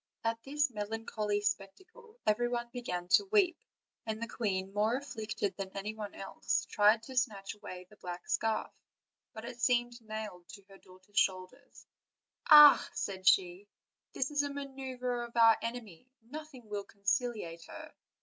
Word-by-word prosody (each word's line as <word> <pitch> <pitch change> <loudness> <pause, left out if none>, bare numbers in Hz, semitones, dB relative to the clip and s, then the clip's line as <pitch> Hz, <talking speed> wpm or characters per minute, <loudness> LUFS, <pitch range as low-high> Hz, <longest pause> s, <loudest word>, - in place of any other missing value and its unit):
At 230 0 -1
this 290 +2 0
melancholy 210 -1 -2
spectacle 370 - -5
everybody 240 +2 +1
began 180 -8 -4
to 405 - +5
weep, 385 -5 +3 0.4
and 220 -1 -4
the 230 - -4
queen, 195 -4 -2
more 215 +3 +2
afflicted 215 -7 -4
than 195 -1 -4
any 210 +2 -3
one 210 -2 -7
else, 195 - -2
tried 215 +2 +4
to 260 +2 -9
snatch 215 -6 -1
away 185 -3 -9
the 210 - -19
black 180 -2 -7
scarf; 225 -1 0 0.6
but 220 +1 -9
it 240 0 -8
seemed 240 -1 +1
nailed 215 -5 -7
to 200 - -12
her 195 - -15
daughter's 185 +3 -4
shoulders: 185 +8 -2 0.6
"Ah!" 295 -1 +10
said 190 -1 -4
she, 185 +2 +3 0.5
"this 265 +2 -1
is 290 -1 +2
a 285 0 -3
ma 280 0 -4
neuver 255 -3 -4
of 235 - -11
our 225 -1 +7
enemy; 230 -3 -6
nothing 275 -1 -10
will 205 -1 -4
conciliate 200 -4 -2
her. - - -10
220 Hz, 155 wpm, -32 LUFS, 200-250 Hz, 0.6 s, Ah